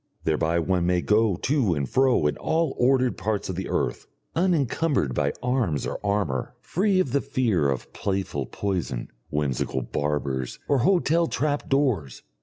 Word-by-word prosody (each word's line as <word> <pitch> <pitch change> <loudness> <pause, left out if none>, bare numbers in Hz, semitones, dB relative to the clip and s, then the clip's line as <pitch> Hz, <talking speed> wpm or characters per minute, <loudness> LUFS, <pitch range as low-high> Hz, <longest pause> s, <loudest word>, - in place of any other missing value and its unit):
Thereby 80 +1 +1
one 85 +1 +1
may 90 -1 +2
go 105 -1 +3
to 115 - +1
and 70 -2 -1
fro 130 - +3
in 75 - +2
all 160 0 +1
the - - -6
ordered 130 0 +2
parts 105 -3 -2
of 95 - -3
the 95 +1 -4
earth, - - -1 0.3
unencumbered 160 - +1
by 70 +2 +1
arms 125 - 0
or - - -5
armour, 100 -10 -1
free 195 +1 +1
of 145 -9 +1
the 140 +1 +2
fear 120 - +1
of 65 -3 -4
playful 95 -9 -2
poison, 90 -11 -3 0.2
whimsical 65 -3 -1
barbers, 70 -2 -2
or 140 - +3
hotel 170 +2 +3
trap 145 -2 -1
doors. 125 - 0
100 Hz, 160 wpm, -25 LUFS, -, 0.3 s, go